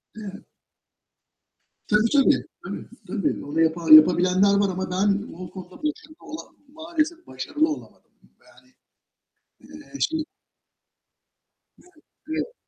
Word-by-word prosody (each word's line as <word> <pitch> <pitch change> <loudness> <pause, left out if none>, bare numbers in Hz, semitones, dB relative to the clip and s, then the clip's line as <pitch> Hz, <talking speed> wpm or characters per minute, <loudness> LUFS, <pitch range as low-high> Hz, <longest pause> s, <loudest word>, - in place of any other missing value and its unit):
Evet. 205 -3 -9 1.4
Tabii 215 +2 +3
tabii. 280 -2 +4 0.2
Tabii - - -7 0.2
tabii. 195 +1 -2
Onu 150 +3 -1
yapa 165 +1 0
yapabilenler 180 +5 +7
var 200 0 +2
ama 185 0 -3
ben 200 +3 +1
o 180 +1 -9
konuda 190 +9 -12
başarılı 305 0 -4
ola 315 - -8 0.3
maalesef 320 +2 -3
başarılı 315 +2 -1
olamadım. 300 - -8 0.3
Yani, - - -23 0.9
eee, 295 -1 -12
şey 315 0 0 1.5
Evet, 360 - -23 0.3
evet. 320 +9 -3
210 Hz, 110 wpm, -24 LUFS, 185-310 Hz, 1.5 s, yapabilenler